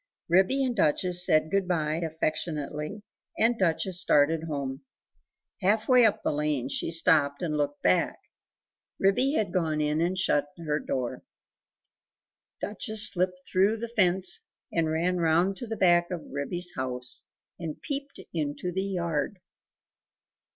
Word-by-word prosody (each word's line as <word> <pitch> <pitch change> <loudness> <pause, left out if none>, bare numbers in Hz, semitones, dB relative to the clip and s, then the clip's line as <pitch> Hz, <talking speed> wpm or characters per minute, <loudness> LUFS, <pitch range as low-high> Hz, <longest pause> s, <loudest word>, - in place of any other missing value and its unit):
Ribby 190 +11 +3
and 250 -2 -1
Duchess 180 0 +2
said 155 -1 +2
good 195 -2 +1
bye 155 -3 0
affectionately, 155 +2 -3 0.3
and 230 +1 +2
Duchess 180 0 +1
started 160 +1 +3
home. 140 -4 -4 0.8
Half 210 +4 +1
way 250 -3 +6
up 210 - -2
the - - +1
lane 145 -4 -1
she - - 0
stopped 160 -3 +2
and 155 -3 -1
looked 145 -1 -2
back; 90 0 +2 0.8
Ribby 250 +9 +2
had 215 -9 -1
gone 160 -5 0
in 150 +1 0
and 180 +2 0
shut 145 -6 +2
her 155 -3 -2
door. 130 -3 -4 1.4
Duchess 210 0 +3
slipped 180 0 -1
through 195 +4 +2
the 235 +1 -5
fence, 185 -5 +2 0.3
and 165 -2 +1
ran 170 +3 0
round 170 +3 +2
to 240 - -6
the 225 0 -4
back 175 -1 +4
of 175 -3 -6
Ribby's 175 +6 -3
house, 125 -1 -5 0.4
and 160 -3 -6
peeped 280 -1 -5
into 155 +2 -3
the 190 +2 -2
yard. 175 -2 -2
175 Hz, 140 wpm, -27 LUFS, 150-195 Hz, 1.4 s, way